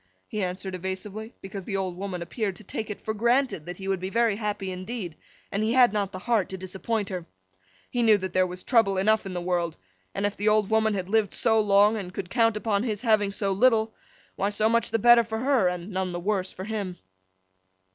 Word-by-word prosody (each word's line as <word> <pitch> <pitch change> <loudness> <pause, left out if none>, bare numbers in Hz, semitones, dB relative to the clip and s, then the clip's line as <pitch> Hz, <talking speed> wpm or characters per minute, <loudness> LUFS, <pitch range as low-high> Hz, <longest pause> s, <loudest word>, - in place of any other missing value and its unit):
He 215 - -3
answered 185 +1 -3
evasively, 190 +5 -5
because 195 -1 -7
the 195 - -2
old 185 -2 -2
woman 185 -2 -4
appeared 200 +1 -3
to 215 - -12
take 215 +2 -5
it 210 - -5
for 220 - -1
granted 235 - +1
that 175 0 -6
he 195 - -7
would 195 -1 0
be 185 +1 -4
very 230 0 +2
happy 205 -3 -3
indeed, 185 -2 -5 0.4
and 200 - -1
he 220 +2 +1
had 245 -4 +5
not 200 -2 -1
the 185 - -6
heart 215 -1 0
to 190 - -5
disappoint 190 +3 -3
her. 180 -3 -5 0.6
He 245 - 0
knew 220 -2 +6
that 190 -1 -5
there 185 0 +3
was 180 0 -8
trouble 225 -6 +3
enough 215 +1 +2
in 185 - -6
the - - -1
world; 175 -2 -1 0.4
and 200 - 0
if 205 0 -1
the 210 +1 +1
old 215 -1 +2
woman 220 -1 +3
had 185 -2 -3
lived 215 0 +1
so 220 -2 +3
long, 205 +1 +4
and 185 -4 -5
could 180 -3 -5
count 230 -3 +3
upon 210 -2 0
his 215 -3 -2
having 215 -4 +2
so 200 0 -1
little, 220 +1 +3 0.4
why 200 - 0
so 210 +1 +2
much 235 0 +2
the - - +1
better 240 +1 +7
for 220 0 -4
her, 255 -5 +2
and 180 +2 -3
none 185 -1 -2
the 175 - -3
worse 190 0 -1
for 185 - -8
him. 200 -4 -4
205 Hz, 230 wpm, -26 LUFS, 185-220 Hz, 0.6 s, better